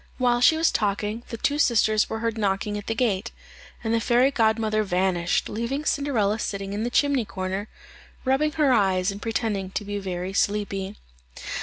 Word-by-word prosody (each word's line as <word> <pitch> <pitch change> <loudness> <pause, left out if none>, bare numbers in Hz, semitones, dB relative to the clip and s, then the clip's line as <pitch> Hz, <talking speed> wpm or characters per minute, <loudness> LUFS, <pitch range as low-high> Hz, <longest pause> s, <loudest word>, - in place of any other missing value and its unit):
While 245 -1 +2
she 315 +5 +6
was 325 0 +3
talking, 210 +2 -1
the 230 - -5
two 290 +6 0
sisters 220 -5 +3
were 220 0 -4
heard 230 -1 -1
knocking 205 -1 -1
at 205 0 -6
the 225 - -1
gate, 225 -3 0 0.5
and 225 0 0
the 230 - +3
fairy 245 +4 +3
godmother 220 -3 +2
vanished, 180 -3 0
leaving 245 +7 -3
Cinderella 230 -9 +1
sitting 200 -2 -3
in 205 - -2
the 240 - -1
chimney 280 0 +2
corner, 190 0 -4 0.6
rubbing 280 +4 +2
her 290 -4 +3
eyes 190 -3 +2
and 200 +1 -8
pretending 215 -4 -2
to 205 +2 -4
be 205 0 -3
very 185 -1 -4
sleepy. 200 -1 -1
215 Hz, 175 wpm, -25 LUFS, 195-240 Hz, 0.6 s, she